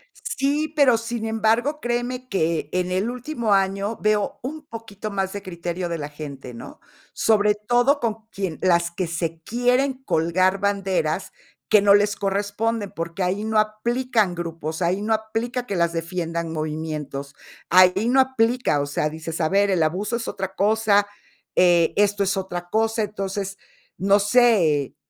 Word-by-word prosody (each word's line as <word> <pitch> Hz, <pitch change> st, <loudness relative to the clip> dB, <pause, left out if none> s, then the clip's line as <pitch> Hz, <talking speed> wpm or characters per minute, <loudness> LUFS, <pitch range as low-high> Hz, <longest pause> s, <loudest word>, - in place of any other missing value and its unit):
Sí, 295 Hz, +3 st, -1 dB
pero, 270 Hz, -6 st, +5 dB
sin 230 Hz, -1 st, -4 dB
embargo, 225 Hz, +7 st, +1 dB
créeme 245 Hz, +1 st, -2 dB
que 165 Hz, -5 st, 0 dB
en 180 Hz, 0 st, -1 dB
el 190 Hz, +6 st, 0 dB
último 245 Hz, -4 st, -1 dB
año, 195 Hz, +3 st, 0 dB
veo 210 Hz, -1 st, +1 dB
un 300 Hz, +4 st, -5 dB
poquito 215 Hz, -2 st, -7 dB
más 195 Hz, -1 st, -2 dB
de 200 Hz, -1 st, -6 dB
criterio 175 Hz, -1 st, -4 dB
de 170 Hz, -1 st, -3 dB
la 145 Hz, 0 st, -5 dB
gente, 140 Hz, -4 st, -9 dB
¿no? -, -, -10 dB, 0.3 s
Sobre 210 Hz, -1 st, +3 dB
todo 245 Hz, +7 st, +2 dB
con 225 Hz, -2 st, -3 dB
quien 190 Hz, -5 st, -4 dB
las 170 Hz, -2 st, +3 dB
que 175 Hz, +1 st, -3 dB
se 165 Hz, 0 st, -3 dB
quieren 250 Hz, +4 st, +1 dB
colgar 185 Hz, +4 st, +2 dB
banderas 195 Hz, -1 st, -1 dB, 0.4 s
que 210 Hz, -, +6 dB
no 200 Hz, -1 st, +6 dB
les 205 Hz, +1 st, +3 dB
corresponden, 205 Hz, +2 st, -1 dB
porque 170 Hz, 0 st, -4 dB
ahí 195 Hz, +4 st, -1 dB
no 220 Hz, 0 st, +1 dB
aplican 215 Hz, -2 st, 0 dB
grupos, 165 Hz, -1 st, -5 dB
ahí 185 Hz, +4 st, 0 dB
no 220 Hz, +1 st, +1 dB
aplica 225 Hz, +3 st, -3 dB
que 200 Hz, -, -3 dB
las 170 Hz, -1 st, +1 dB
defiendan 165 Hz, 0 st, -3 dB
movimientos. 155 Hz, -3 st, -4 dB, 0.3 s
Ahí 185 Hz, +5 st, +5 dB
no 265 Hz, +2 st, +3 dB
aplica, 245 Hz, -, +2 dB
o 145 Hz, -, -1 dB
sea, 150 Hz, +1 st, -1 dB
dices: 160 Hz, +2 st, -6 dB
"A 160 Hz, -, +2 dB
ver, 200 Hz, +2 st, +3 dB
el 175 Hz, -4 st, +2 dB
abuso 195 Hz, +8 st, -1 dB
es 230 Hz, -, -5 dB
otra 190 Hz, -1 st, -4 dB
cosa, 205 Hz, 0 st, +3 dB, 0.5 s
eh, 175 Hz, -2 st, +4 dB
esto 205 Hz, 0 st, +2 dB
es 195 Hz, +1 st, 0 dB
otra 175 Hz, -2 st, -4 dB
cosa", 225 Hz, +1 st, +1 dB
entonces, 195 Hz, -1 st, -4 dB, 0.4 s
no 195 Hz, +2 st, +4 dB
sé, 200 Hz, -, +3 dB
200 Hz, 160 wpm, -23 LUFS, 170-225 Hz, 0.5 s, que